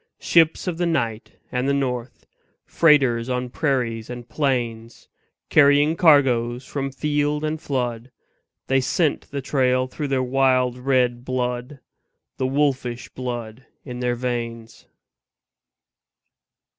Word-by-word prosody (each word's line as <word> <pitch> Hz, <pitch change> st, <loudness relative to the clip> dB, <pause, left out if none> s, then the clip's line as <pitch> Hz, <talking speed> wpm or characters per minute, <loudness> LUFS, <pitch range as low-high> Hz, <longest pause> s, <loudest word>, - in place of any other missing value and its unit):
Ships 165 Hz, -1 st, +3 dB
of 175 Hz, -3 st, -3 dB
the 175 Hz, -, +1 dB
night 115 Hz, -9 st, -2 dB, 0.2 s
and 125 Hz, +2 st, -1 dB
the 140 Hz, -, +2 dB
north, 125 Hz, -3 st, -3 dB, 0.4 s
Freighters 130 Hz, -7 st, +3 dB
on 125 Hz, -1 st, -2 dB
prairies 120 Hz, -7 st, -1 dB
and 120 Hz, -1 st, -8 dB
plains, 120 Hz, -3 st, -2 dB, 0.4 s
Carrying 145 Hz, +1 st, +5 dB
cargoes 130 Hz, -7 st, +3 dB
from 135 Hz, 0 st, -4 dB
field 150 Hz, +1 st, -1 dB
and 155 Hz, 0 st, -2 dB
flood 125 Hz, -3 st, -3 dB, 0.6 s
They 135 Hz, 0 st, +2 dB
scent 150 Hz, +4 st, 0 dB
the 140 Hz, -1 st, -5 dB
trail 130 Hz, -2 st, +1 dB
through 145 Hz, +3 st, -5 dB
their 135 Hz, -2 st, 0 dB
wild 130 Hz, -1 st, +2 dB
red 125 Hz, -2 st, +1 dB
blood, 125 Hz, +1 st, -3 dB, 0.6 s
The 130 Hz, -, 0 dB
wolfish 130 Hz, -3 st, -1 dB
blood 120 Hz, -1 st, -6 dB, 0.2 s
in 125 Hz, -3 st, -7 dB
their 125 Hz, -1 st, 0 dB
veins. 115 Hz, -2 st, -5 dB
130 Hz, 120 wpm, -22 LUFS, 120-140 Hz, 0.6 s, Carrying